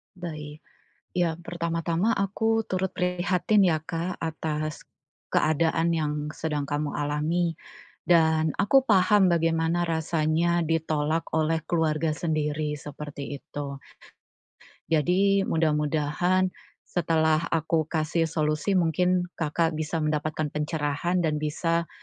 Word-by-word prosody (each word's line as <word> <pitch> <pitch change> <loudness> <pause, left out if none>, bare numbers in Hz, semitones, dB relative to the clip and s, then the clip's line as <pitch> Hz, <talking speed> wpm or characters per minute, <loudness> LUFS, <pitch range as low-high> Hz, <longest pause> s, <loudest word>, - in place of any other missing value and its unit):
Baik. 155 -4 -7 0.6
Yang 170 -1 0
pertama-tama 170 +4 -1
aku 220 +3 +1
turut 185 0 -1
prihatin 180 +2 +2
ya 160 -3 +2
Kak 165 +3 -3
atas, 155 -1 -3 0.5
keadaan 160 +2 +2
yang 155 -3 0 0.2
sedang 150 -2 -3
kamu 145 0 -2
alami, 155 +3 -1 0.5
dan 160 -2 +3
aku 265 +6 +4
paham 200 -2 +5
bagaimana 165 +1 +1
rasanya 160 +1 +1
ditolak 160 0 0
oleh 160 0 +1
keluarga 160 -2 +1
sendiri 150 -2 -1
seperti 145 -1 -7
itu. 140 -1 -6 1.1
Jadi, 190 +6 +3
mudah-mudahan, 160 +4 +1 0.3
setelah 160 -2 +1
aku 160 -1 0
kasih 160 +1 0
solusi, 155 +4 0
mungkin, 180 +1 +2
Kakak 165 +1 0
bisa 155 +1 -3
mendapatkan 155 0 -1
pencerahan 150 +3 -1
dan 150 -1 0
bisa, 165 +2 -1
160 Hz, 105 wpm, -26 LUFS, 150-175 Hz, 1.1 s, paham